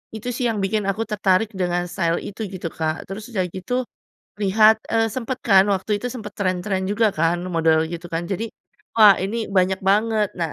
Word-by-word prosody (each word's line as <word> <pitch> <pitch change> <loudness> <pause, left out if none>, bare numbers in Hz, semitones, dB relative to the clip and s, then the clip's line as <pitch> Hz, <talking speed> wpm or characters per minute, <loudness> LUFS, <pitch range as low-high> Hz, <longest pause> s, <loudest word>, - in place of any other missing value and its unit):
itu 220 +3 -5
sih 250 - -1
yang 225 - -2
bikin 210 +2 0
aku 205 +3 -1
tertarik 210 0 +2
dengan 175 -1 0
style 170 -2 0
itu 215 +2 -6
gitu, 185 -2 -8
Kak, 160 -1 -3
terus 210 +5 -7
udah 190 -4 0
gitu 220 +9 -3 0.6
lihat, 215 +3 +5 0.2
eee, 225 0 +3
sempet 255 +1 -4
kan 195 -3 +6
waktu 200 +2 0
itu 250 - -3
sempet 210 -4 -7
trend-trend 190 0 -1
juga 220 +2 +3
kan 165 +1 +1 0.2
model 160 -1 +3
gitu 170 0 -6
kan, 165 +1 -1
jadi 210 +4 -3 0.5
wah 210 -4 +8
ini 220 +4 -2
banyak 190 0 +2
banget. 215 +1 +2
Nah, 165 -3 -1
195 Hz, 190 wpm, -22 LUFS, 180-220 Hz, 0.6 s, wah